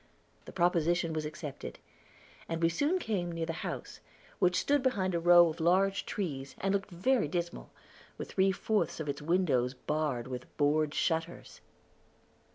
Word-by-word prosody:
The - - -9
proposition 170 -1 +1
was 155 -1 -2
accepted, 150 -2 -7 0.7
and 165 0 -2
we 165 - +5
soon 290 - +1
came 200 - -2
near 165 -1 -2
the 165 - -3
house, - - -6 0.4
which 180 -2 +3
stood 290 -1 +2
behind 200 -8 0
a 170 - +1
row 175 0 +7
of 160 +2 -7
large 190 +4 +2
trees, 140 -9 -4
and 195 +1 0
looked 200 0 -1
very 205 - +1
dismal, 170 +2 -4 0.5
with - - -6
three 195 0 +3
fourths 210 0 -1
of 155 - -4
its 145 0 -3
windows 145 -7 +1
barred 145 -4 -2
with 125 -1 -8
board 150 +1 +2
shutters. 165 0 -2
170 Hz, 160 wpm, -31 LUFS, 155-190 Hz, 0.7 s, row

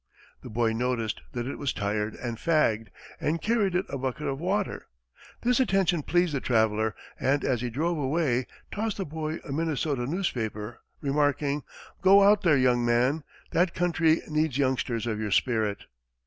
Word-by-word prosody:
The - - -9
boy 115 0 +1
noticed 115 -2 -1
that 120 -1 -3
it 135 - -5
was 140 -2 -1
tired 105 +1 -2
and 120 -2 -4
fagged 115 -6 +1 0.3
and 160 +3 0
carried 210 -4 +1
it 185 +2 +1
a 140 - -5
bucket 135 +3 -3
of 135 -1 -2
water. 190 +4 -2 0.6
This 250 +1 +3
attention 195 -9 +2
pleased 175 +1 +1
the 135 - -1
traveler, 110 -2 +1 0.2
and 140 +2 +1
as 120 -3 0
he 125 - -2
drove 160 +7 -1
away, 135 -3 0 0.2
tossed 215 0 -2
the 195 - -2
boy 155 +1 -4
a - - -5
Minnesota 145 -4 -1
newspaper, 120 - -3 0.2
remarking, 145 0 +1 0.4
"Go 195 +1 +7
out 205 +1 +5
there, 165 -6 +4
young 125 -2 +3
man. 125 +6 +2 0.3
That 175 +1 +2
country 165 -2 +2
needs 155 -3 0
youngsters 130 -4 0
of 110 -2 -2
your 110 -1 -2
spirit." 110 -2 +1
140 Hz, 165 wpm, -27 LUFS, 120-170 Hz, 0.6 s, Go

